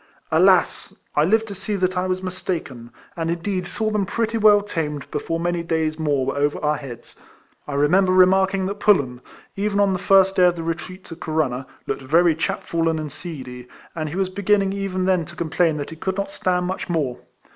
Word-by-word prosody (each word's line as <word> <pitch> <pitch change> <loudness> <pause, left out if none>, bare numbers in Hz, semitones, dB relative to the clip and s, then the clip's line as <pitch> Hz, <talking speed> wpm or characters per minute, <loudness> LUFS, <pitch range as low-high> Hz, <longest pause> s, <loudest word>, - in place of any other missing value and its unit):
Alas! - - +3 0.2
I 150 - +4
lived 220 +6 +2
to - - -5
see 200 +2 -3
that 185 -1 0
I 180 +1 0
was 185 0 -2
mistaken; 165 -10 -4 0.3
and, 165 -1 -2
indeed, 180 +2 -2
saw 215 +3 -2
them 205 -3 0
pretty 230 +2 -1
well 210 -2 +5
tamed 150 -7 -3
before 165 +3 -2
many 175 0 -1
days 160 -2 -1
more 145 -4 +1
were 135 - -2
over 145 +1 0
our 150 0 +2
heads! 125 -5 -10 0.5
I 145 - -4
remember 180 +7 +3
remarking 190 +1 +4
that 200 +2 -4
Pullen 140 -13 +2 0.3
(even 205 0 -1
on 200 -1 +3
the 185 - -2
first 195 0 +4
day 180 - +6
of 175 - +1
the 165 - -5
retreat 170 +3 -5
to 165 - -9
Corunna) 150 -6 -2 0.2
looked - - -3
very 165 +5 +3
chapfallen 165 +1 -1
and 155 -2 -5
seedy; 130 -6 -8 0.3
and 155 -2 -3
he 155 - -6
was 190 -1 0
beginning 195 0 +1
even 195 -2 -2
then 185 -2 +2
to - - -12
complain 165 -1 +1
that 145 +1 -5
he - - -7
could 190 +4 -3
not 200 0 -2
stand 180 -2 0
much 185 0 -4
more. 145 -8 -1
175 Hz, 200 wpm, -22 LUFS, 155-190 Hz, 0.5 s, day